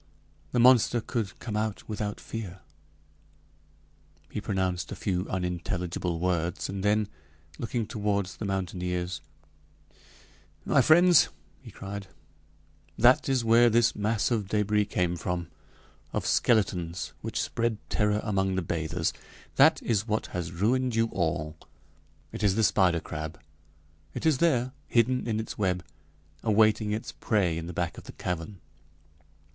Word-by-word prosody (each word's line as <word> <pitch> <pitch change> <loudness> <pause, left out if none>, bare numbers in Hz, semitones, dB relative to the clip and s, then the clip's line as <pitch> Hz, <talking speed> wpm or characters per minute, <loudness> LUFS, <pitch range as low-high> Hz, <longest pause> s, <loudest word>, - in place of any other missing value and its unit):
"The - - -1
monster 120 -1 +6
could 110 -4 -3
come 110 -3 -5
out 105 -1 -2
without 105 -1 -3
fear 100 -5 -7 0.8
" - - -34
He 105 - -3
pronounced 95 -4 -1
a - - -4
few 90 -1 -2
unintelligible 90 -1 -2
words, 90 0 -1
and 95 0 -4
then, 105 0 +2 0.5
looking 115 0 -2
toward 105 -3 -1
the 100 +3 -7
mountaineers: 90 -2 -2 1.4
"My - - +4
friends," 175 +1 +6 0.3
he - - -11
cried, 100 0 -7 0.9
"that 125 +4 +5
is 130 -3 +1
where 115 +1 +6
this 115 +1 +3
mass 105 +2 0
of 110 -5 0
débris 105 0 +1
came 90 -1 0
from 85 0 -3 0.6
of - - -2
skeletons 90 -8 +1
which 110 - -3
spread 115 -2 -1
terror 105 0 +1
among 95 -3 0
the 95 - -1
bathers. 80 0 -1 0.4
That - - +5
is 110 -2 0
what 110 0 0
has 90 -2 -3
ruined 120 +7 +1
you 115 0 +2
all 80 -3 -1 0.8
it - - -6
is 100 -3 +3
the 110 - +2
spider 90 -5 +3
crab! 80 0 -6 0.8
It - - -4
is 155 -5 +3
there 130 -7 +2 0.2
hidden 125 +1 +2
in 110 -1 0
its 110 - -6
web 90 -3 0 0.6
awaiting 110 0 +3
its 110 +2 -3
prey 95 -7 0
in 85 0 -5
the - - -5
back 85 0 -2
of - - -15
the - - -10
cavern! 90 +1 -5
100 Hz, 140 wpm, -28 LUFS, 90-110 Hz, 1.4 s, monster